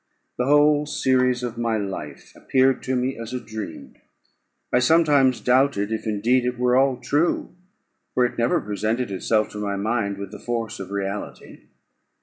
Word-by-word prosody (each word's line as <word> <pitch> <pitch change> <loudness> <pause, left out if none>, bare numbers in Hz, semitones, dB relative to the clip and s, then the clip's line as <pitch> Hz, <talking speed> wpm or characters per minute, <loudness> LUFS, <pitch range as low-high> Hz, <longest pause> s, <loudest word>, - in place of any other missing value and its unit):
The 125 - +1
whole 150 +1 +4
series 125 -3 +1
of 120 -1 -4
my 115 -2 0
life 100 -2 -6
appeared 130 0 +2
to 130 - 0
me 125 0 -1
as 115 +1 -7
a - - -2
dream; 110 -9 -8 0.8
I 125 - +5
sometimes 140 -2 +4
doubted 125 -5 +2
if 110 0 -3
indeed 115 +4 +2
it 125 0 -2
were 125 0 +2
all 135 -1 +3
true, 145 +7 0 0.6
for 125 - +4
it 120 - -3
never 120 +1 +1
presented 110 +3 -2
itself 105 +3 0
to 105 - -8
my 100 -1 -2
mind 100 -1 -1
with 100 0 -7
the - - -9
force 115 -2 -4
of 95 -1 -7
reality. 100 0 -6
120 Hz, 165 wpm, -23 LUFS, 105-130 Hz, 0.8 s, I